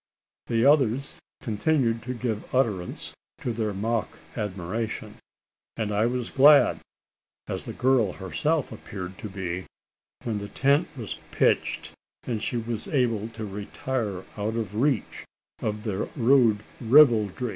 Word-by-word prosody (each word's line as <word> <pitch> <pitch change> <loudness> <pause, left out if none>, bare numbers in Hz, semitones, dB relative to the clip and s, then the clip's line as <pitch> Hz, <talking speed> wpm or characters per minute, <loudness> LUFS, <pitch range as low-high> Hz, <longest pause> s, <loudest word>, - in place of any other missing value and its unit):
The 115 +1 +2
others 135 -2 +3 0.2
continued 115 +1 +1
to 125 - -1
give 115 -1 -3
utterance 105 -9 -1 0.3
to 120 - -2
their 110 -1 -1
mock 110 +2 -2 0.2
admiration; 105 +2 -4 0.6
and 110 -2 -1
I 105 +2 +2
was 125 -1 -2
glad 145 +2 +6 0.7
as - - -3
the - - -5
girl 125 -7 +2
herself 135 - -1
appeared 95 -4 -7
to 105 - -6
be 95 -2 -4 0.6
when 110 -3 -2
the 100 - -6
tent 140 - +2
was 115 -5 -5
pitched, - - +1 0.3
and 115 -4 -3
she 120 - -2
was 115 -1 -3
able 115 -6 +1
to 115 -1 -6
retire 105 0 -3 0.2
out 105 +2 -2
of 110 -4 -3
reach 130 +1 0 0.4
of 105 0 -2
their 105 -3 -2
rude 120 -5 +4 0.2
ribaldry. 120 -3 +5
115 Hz, 135 wpm, -26 LUFS, 105-125 Hz, 0.7 s, glad